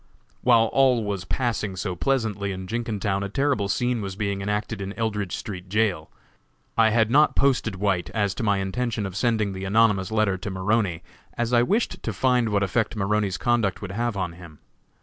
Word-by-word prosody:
While 115 -2 +5
all 130 -4 +4
was 100 -3 -3
passing 105 -4 -2
so 90 0 -3
pleasantly 105 -2 -1
in 95 -1 -5
Jenkintown, 105 -2 -2
a 100 - -3
terrible 130 -4 0
scene 125 +2 0
was 95 -2 -5
being 100 -1 -2
enacted 105 +1 -2
in 100 0 -4
Eldridge 105 -5 -2
street 95 -3 -7
jail. 100 -6 0 0.7
I 110 -1 +5
had 110 0 +2
not 150 +4 +4
posted 125 -7 +2
White 95 -3 0
as 100 -3 0
to - - -5
my 100 -2 +2
intention 110 +3 -2
of 95 -2 -6
sending 110 -2 +1
the 95 0 -6
anonymous 105 -1 +2
letter 110 -4 +1
to 100 - -5
Maroney, 95 -2 0 0.3
as 120 +1 -1
I 120 - +6
wished 210 - 0
to 110 - -3
find 125 +2 +2
what 100 -1 +1
effect 110 +4 0
Maroney's 105 -1 0
conduct 120 -6 +1
would 95 - -5
have 115 +1 -2
on 90 -3 -2
him. 85 -3 -13
105 Hz, 190 wpm, -24 LUFS, 95-115 Hz, 0.7 s, I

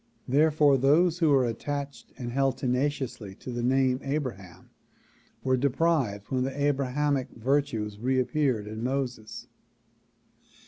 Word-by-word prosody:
Therefore 145 0 +4
those 160 +6 +3
who 165 -3 +3
were 135 -3 +4
attached 140 +4 -5
and 120 -2 -5
held 135 +1 +1
tenaciously 125 -6 -2
to 125 - -8
the 120 0 -3
name 130 +1 +2
Abraham 130 - -5 0.7
were 130 -1 +2
deprived 135 -6 0
when 130 -1 +1
the 135 +2 -4
Abrahamic 140 -1 0
virtues 115 -5 -1
reappeared 130 -1 0
in 110 +2 -6
Moses. 125 -4 -3
130 Hz, 120 wpm, -27 LUFS, 120-145 Hz, 0.7 s, Therefore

